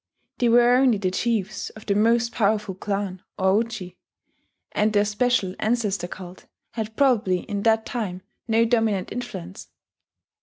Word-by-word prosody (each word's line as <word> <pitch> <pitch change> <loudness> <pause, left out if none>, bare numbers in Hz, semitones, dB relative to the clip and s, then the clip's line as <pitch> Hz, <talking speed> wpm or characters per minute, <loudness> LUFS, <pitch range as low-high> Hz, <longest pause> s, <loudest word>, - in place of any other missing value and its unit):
They 240 - +3
were 240 +1 +5
only 255 -4 +4
the 190 -2 -1
chiefs 215 -1 -1
of 215 - -14
the 200 - +1
most 230 +3 +2
powerful 210 -2 0
clan, 195 -1 -3 0.2
or 190 +3 +3
Uji, 215 -6 -7 0.7
and 210 +1 +1
their 205 -1 +3
special 210 -2 +1
ancestor 210 -6 0
cult 180 0 -10 0.2
had 220 -1 -5
probably 215 -10 +2
in 205 -2 -4
that 225 0 +2
time 190 -6 -4 0.2
no 225 0 +3
dominant 225 -5 +1
influence. 95 - -7
215 Hz, 145 wpm, -24 LUFS, 190-230 Hz, 0.7 s, were